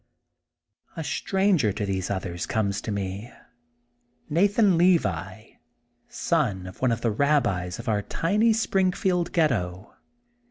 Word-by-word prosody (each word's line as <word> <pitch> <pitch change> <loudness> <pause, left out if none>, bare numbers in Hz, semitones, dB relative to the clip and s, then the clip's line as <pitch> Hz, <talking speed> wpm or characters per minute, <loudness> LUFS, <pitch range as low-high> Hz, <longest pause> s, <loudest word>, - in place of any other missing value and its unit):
A - - -3
stranger 190 - +1
to 105 - -3
these 95 -2 -2
others 95 -3 -3
comes 100 -3 -1
to - - -5
me. 100 +3 -4 1.0
Nathan 200 +3 +3
Levi, 110 - +1 0.6
son 115 - -1
of 90 0 -11
one 130 -2 +2
of 115 0 -2
the 115 - +1
Rabbis 105 -9 +1
of - - -9
our 105 -2 +1
tiny 210 - +1
Springfield 190 -4 +1
Ghetto. 105 - -1
115 Hz, 120 wpm, -25 LUFS, -, 1.0 s, Nathan